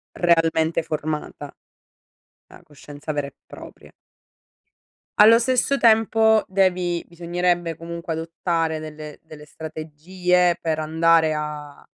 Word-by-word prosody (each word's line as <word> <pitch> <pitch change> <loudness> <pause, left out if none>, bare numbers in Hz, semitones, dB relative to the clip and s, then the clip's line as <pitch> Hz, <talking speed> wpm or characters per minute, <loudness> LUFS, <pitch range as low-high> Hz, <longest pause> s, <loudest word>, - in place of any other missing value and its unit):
realmente 165 -1 +2
formata. 150 -2 -5 0.9
La - - -16
coscienza 145 +1 -9
vera 145 -1 -2
e 140 - -14
propria. - - -13 1.3
Allo 225 +2 +8
stesso 255 +3 +1
tempo 220 -1 +4
devi 180 -3 0
bisognerebbe 175 0 -1
comunque 170 +1 -6
adottare 165 0 -2
delle 155 -1 -9
delle 155 -2 -13
strategie 170 +4 -1
per 160 -2 -2
andare 160 0 +2
a 150 -1 -7
165 Hz, 100 wpm, -22 LUFS, 155-180 Hz, 1.3 s, Allo